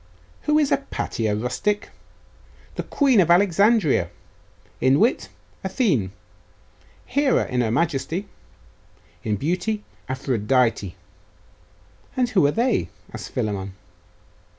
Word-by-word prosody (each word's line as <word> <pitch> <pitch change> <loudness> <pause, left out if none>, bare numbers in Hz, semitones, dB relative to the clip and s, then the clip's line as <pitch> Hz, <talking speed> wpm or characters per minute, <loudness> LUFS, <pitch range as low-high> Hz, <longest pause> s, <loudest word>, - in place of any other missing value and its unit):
'Who 300 0 +4
is 295 -2 +2
Hypatia, 115 - -1
rustic? 125 - -1 0.8
The - - -3
queen 270 -6 +3
of 170 - +1
Alexandria! 200 - +4 0.7
In 130 +2 +4
wit, 235 +4 +2 0.3
Athene; 185 - +1 0.9
Hera 280 0 +2
in 125 -3 0
majesty; 165 - -1 1.0
in 105 -2 0
beauty, 180 - -1 0.3
Aphrodite!' 125 -6 0 1.2
'And 250 -2 +2
who 185 -11 +4
are - - +2
they?' 240 - +1 0.2
asked - - -7
Philammon. 100 -6 -2
165 Hz, 95 wpm, -23 LUFS, -, 1.2 s, Who